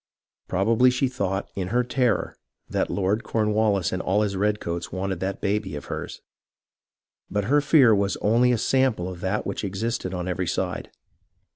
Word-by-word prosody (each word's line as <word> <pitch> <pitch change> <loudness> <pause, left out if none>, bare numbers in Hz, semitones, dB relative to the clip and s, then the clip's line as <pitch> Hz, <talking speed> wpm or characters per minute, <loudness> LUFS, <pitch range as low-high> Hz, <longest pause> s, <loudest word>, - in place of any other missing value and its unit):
Probably 110 +7 +3
she 125 +2 +1
thought, 100 -6 -2
in 95 -2 -3
her 120 +5 +1
terror, 125 0 0 0.3
that - - -1
Lord 100 +3 0
Cornwallis 105 -4 +1
and 95 - -2
all 100 +3 +1
his 100 -2 -2
redcoats 90 -4 -1
wanted 95 -1 -3
that 95 +2 -3
baby 100 -5 -1
of 75 - -7
hers. - - -6 1.1
But 105 0 -1
her 145 +8 +3
fear 140 -6 +5
was 100 -1 +1
only 120 +4 +3
a 120 - +2
sample 125 -6 +1
of 90 -1 -7
that 95 +3 -1
which 100 - -3
existed 100 0 -2
on 90 -1 -4
every 90 0 -2
side. - - -2
100 Hz, 165 wpm, -25 LUFS, 95-115 Hz, 1.1 s, fear